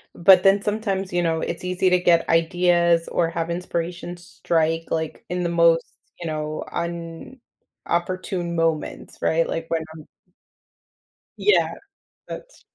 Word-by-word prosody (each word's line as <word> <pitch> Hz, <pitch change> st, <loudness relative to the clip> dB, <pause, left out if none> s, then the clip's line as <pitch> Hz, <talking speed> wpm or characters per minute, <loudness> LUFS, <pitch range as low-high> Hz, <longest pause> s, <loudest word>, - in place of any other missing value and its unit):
but 185 Hz, +2 st, +6 dB
then 195 Hz, +1 st, +5 dB
sometimes, 200 Hz, -3 st, -2 dB
you 175 Hz, -, +2 dB
know, 165 Hz, -1 st, 0 dB
it's 170 Hz, -, -4 dB
easy 180 Hz, +1 st, +1 dB
to 180 Hz, 0 st, +4 dB
get 170 Hz, -2 st, +3 dB
ideas 170 Hz, 0 st, +3 dB
or 165 Hz, -1 st, 0 dB
have 165 Hz, 0 st, -3 dB
inspiration 175 Hz, 0 st, -4 dB
strike, 165 Hz, -2 st, -1 dB
like, 160 Hz, -1 st, -3 dB
in 180 Hz, 0 st, -2 dB
the 170 Hz, -, 0 dB
most, 170 Hz, -1 st, +4 dB, 0.3 s
you 175 Hz, -, -6 dB
know, 155 Hz, 0 st, -3 dB, 1.2 s
inopportune 175 Hz, 0 st, -2 dB
moments, 165 Hz, -2 st, -2 dB
right? 165 Hz, +1 st, +2 dB
Like, 165 Hz, 0 st, -3 dB
when 165 Hz, -1 st, 0 dB
I'm 155 Hz, -, -12 dB, 1.3 s
Yeah, 420 Hz, -, +3 dB, 0.6 s
that's -, -, -10 dB
170 Hz, 130 wpm, -23 LUFS, 165-180 Hz, 1.3 s, but